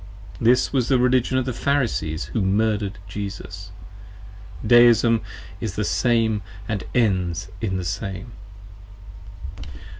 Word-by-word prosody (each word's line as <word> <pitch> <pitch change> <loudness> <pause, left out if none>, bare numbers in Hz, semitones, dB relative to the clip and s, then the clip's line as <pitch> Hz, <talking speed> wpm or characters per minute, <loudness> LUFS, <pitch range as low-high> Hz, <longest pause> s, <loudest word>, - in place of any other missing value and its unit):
This 120 +4 +3
was 125 -3 +1
the 135 - +3
Religion 125 +1 +2
of 130 - 0
the 130 - -2
Pharisees 120 - -1
who 110 - +1
murder'd 105 +1 0
Jesus. 95 -1 -7 1.0
Deism 120 -1 +6 0.4
is 110 -5 -4
the 105 - -1
same 115 -3 +1 0.3
& 105 -3 -4
ends 95 -6 +1
in 95 -4 -1
the 90 - -4
same. 100 +5 -4
110 Hz, 115 wpm, -23 LUFS, 95-120 Hz, 1.0 s, Deism